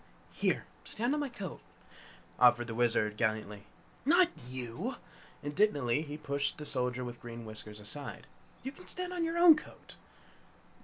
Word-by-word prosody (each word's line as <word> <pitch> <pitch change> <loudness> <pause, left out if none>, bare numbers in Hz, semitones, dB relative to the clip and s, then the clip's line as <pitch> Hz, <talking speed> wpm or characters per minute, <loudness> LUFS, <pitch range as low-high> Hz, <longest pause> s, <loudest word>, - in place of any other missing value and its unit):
"Here, - - 0 0.2
stand 240 +5 -1
on 300 - +1
my 290 -2 -1
coat," 200 -8 -7 0.8
offered 120 -1 +6
the 115 - -5
Wizard, 110 -3 +2
gallantly. 105 -2 -1 0.4
"Not 345 +5 +6 0.2
YOU!" 125 -3 -4 0.5
Indignantly 145 - +2
he 150 -1 -6
pushed 140 -2 0
the 150 - -7
Soldier 125 -2 0
with 120 0 -7
Green 115 -1 -7
Whiskers 110 -1 -8
aside. 125 +7 -7 0.4
"You 265 - -3
can 360 +6 -15
stand 365 0 -2
on 350 -2 0
your 330 +1 -1
own 340 -2 +9
coat!" 305 - -10
140 Hz, 150 wpm, -32 LUFS, -, 0.8 s, own